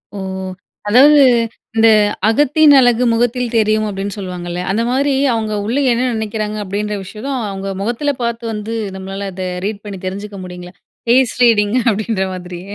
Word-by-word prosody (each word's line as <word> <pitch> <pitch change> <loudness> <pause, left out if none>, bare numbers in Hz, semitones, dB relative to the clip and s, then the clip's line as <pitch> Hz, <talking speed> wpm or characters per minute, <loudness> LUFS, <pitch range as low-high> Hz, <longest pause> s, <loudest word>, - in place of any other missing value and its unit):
ஓ! - - -5 0.7
அதாவது, 280 +6 +6 0.5
"இந்த 225 0 +5 0.4
அகத்தின் 295 +5 +4
அழகு 245 -1 +3
முகத்தில் 240 +1 0
தெரியும்," 215 0 +2
அப்படின்னு 200 +1 -4
சொல்லுவாங்கள்ல, 180 -2 -5
அந்த 225 +4 0
மாரி 275 +2 +1 0.2
அவங்க 220 -2 -2
உள்ள 240 +6 -1 0.2
என்ன 240 +2 0
நினைக்கிறாங்க 215 -1 -3
அப்டின்ற 205 +2 -3
விஷயத்து 215 +8 -7 0.2
அவங்க 195 0 -5
முகத்தில 245 +7 -1
பார்த்து 235 0 -3
வந்து 215 +2 -5 0.2
நம்மளால 195 +1 -6
அத 185 0 -4 0.2
ரீட் 210 -1 -4
பண்ணி 195 -2 -7
தெரிஞ்சுக்க 200 +1 -6
முடியுங்களா? 180 0 -10 0.3
பேஸ் 255 0 +3
ரீடிங்க 220 0 +3
அப்டின்ற 210 -1 -2
மாதிரி. 180 -1 -8
215 Hz, 145 wpm, -17 LUFS, 195-235 Hz, 0.7 s, அதாவது